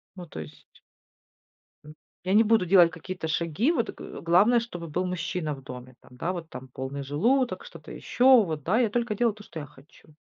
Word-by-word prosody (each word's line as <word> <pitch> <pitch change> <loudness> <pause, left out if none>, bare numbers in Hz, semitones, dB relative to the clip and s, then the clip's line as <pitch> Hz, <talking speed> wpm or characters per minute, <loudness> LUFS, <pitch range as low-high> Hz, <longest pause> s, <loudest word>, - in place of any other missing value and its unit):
Ну 180 -2 -9
то 80 - -8
есть 75 0 -11 1.2
М, 150 - -11 0.3
я 185 - 0
не 220 +2 +6
буду 220 -4 +3
делать 175 -2 +6
какие-то 180 +1 -6
шаги, 170 - 0
вот 235 -9 -1
г - - -9
главное, 195 +8 +4
чтобы 175 -8 -7
был 180 +4 -2
мужчина 170 -3 -3
в 135 - -11
доме, 125 -1 -10
там, 125 - -18
да, 170 +6 -2
вот 170 -3 -7
там 130 -3 -9
полный 130 +2 -5
желудок, 235 - +1
что-то - - -12
ещё, 255 -1 +4
вот 155 -6 -4
да, 215 +8 +2
я 235 - +2
только 235 0 -1
делаю 235 +1 +2
то, 210 - -13
что 165 - -9
я 145 - -6
хочу. 150 +1 -20
175 Hz, 205 wpm, -26 LUFS, 150-220 Hz, 1.2 s, не